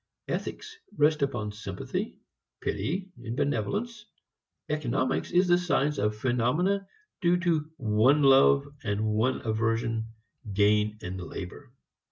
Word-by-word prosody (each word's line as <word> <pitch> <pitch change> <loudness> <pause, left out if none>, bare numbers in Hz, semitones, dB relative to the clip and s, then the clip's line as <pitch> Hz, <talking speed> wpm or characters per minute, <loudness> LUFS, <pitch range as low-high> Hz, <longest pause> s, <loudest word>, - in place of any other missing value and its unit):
Ethics 435 +1 -4 0.2
rest 150 0 +3
upon 120 -7 -1
sympathy, 100 -3 -5 0.4
pity, 190 +5 -2
benevolence. 205 - -2 0.6
Economics - - -1
is 180 +1 +3
the 175 0 +5
science 150 -4 +1
of 105 +1 0
phenomena 135 - +1 0.3
due 175 -1 +4
to 160 -4 0
one 125 +5 +3
love 135 +1 +6 0.2
and 105 0 -1
one 110 +4 +1
aversion 115 0 0 0.5
gain 105 +1 +3
and 90 +1 -5
labor. 95 +9 -8
130 Hz, 110 wpm, -28 LUFS, 105-170 Hz, 0.6 s, love